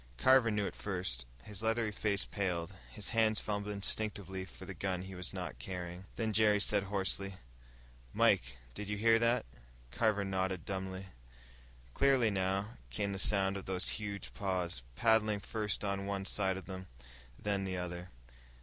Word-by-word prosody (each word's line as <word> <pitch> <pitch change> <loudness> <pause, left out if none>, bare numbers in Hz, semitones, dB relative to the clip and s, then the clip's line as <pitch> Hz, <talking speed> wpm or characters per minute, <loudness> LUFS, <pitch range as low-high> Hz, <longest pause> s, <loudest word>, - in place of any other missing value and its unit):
Carver 130 - +6
knew 105 -1 +1
it - - -4
first. 90 -12 -1 0.2
His 105 -1 -4
leathery 115 -1 +1
face 100 -1 +1
paled; 90 -2 -2 0.2
his 105 - -2
hands 110 -2 +3
fumbled 105 0 -2
instinctively 100 -2 -2
for 95 - -11
the - - -6
gun 95 -2 -2
he 95 0 -8
was 90 -1 -2
not - - -5
carrying. 90 +5 -5
Then 110 -1 -1
Jerry 105 -1 +5
said 100 -1 +3
hoarsely, 100 0 -1 0.8
"Mike, - - +3 0.2
did 105 +6 -5
you 105 - -1
hear 115 +2 +5
that?" 115 +1 +3 0.5
Carver 105 - +2
nodded 95 -2 -1
dumbly. 95 0 -3 0.9
Clearly, 135 -5 +4
now, 95 +2 0
came 100 +11 -1
the 95 - -4
sound 100 -1 +3
of 95 - -8
those 95 -1 +1
huge 100 -1 -4
paws, 90 -8 -1
padding 110 - +3
first 105 0 -1
on 100 0 -1
one 100 -1 -2
side 95 -1 +1
of 95 - -7
them, 95 -1 -7 0.5
then 100 -1 -1
the 95 -1 -2
other. 90 0 -4
100 Hz, 160 wpm, -34 LUFS, 95-105 Hz, 0.9 s, Carver